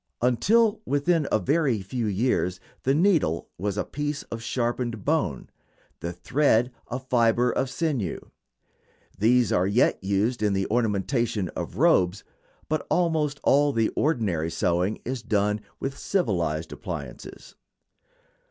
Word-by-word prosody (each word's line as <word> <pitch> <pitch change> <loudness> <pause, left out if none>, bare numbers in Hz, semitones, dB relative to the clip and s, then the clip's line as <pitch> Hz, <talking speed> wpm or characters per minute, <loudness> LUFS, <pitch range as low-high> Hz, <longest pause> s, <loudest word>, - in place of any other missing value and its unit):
Until 210 - +3
within 145 +1 +1
a - - +4
very 120 - +1
few 115 +4 -3
years 100 -3 0 0.2
the 135 +2 +2
needle 160 - +2
was 100 +1 -2
a - - +1
piece 145 0 -3
of 115 - -4
sharpened 120 -3 -2
bone; - - 0 0.5
the 85 - -4
thread 120 - +2 0.2
a 125 - -3
fiber 125 -2 +2
of 130 0 -1
sinew. 135 - -2 1.0
These 120 +1 +3
are 90 +1 +2
yet 100 -1 +2
used 100 +5 0
in 105 -2 +2
the 95 0 0
ornamentation 115 -2 0
of 90 - -6
robes, 105 - +3 0.4
but 155 0 -2
almost 160 -4 +1
all 145 +1 +4
the 115 -2 +2
ordinary 105 - 0
sewing 90 +4 0
is 130 0 -3
done 105 -2 0 0.2
with 135 0 -3
civilized 85 - -1
appliances. 65 -4 -8
120 Hz, 130 wpm, -25 LUFS, 100-140 Hz, 1.0 s, a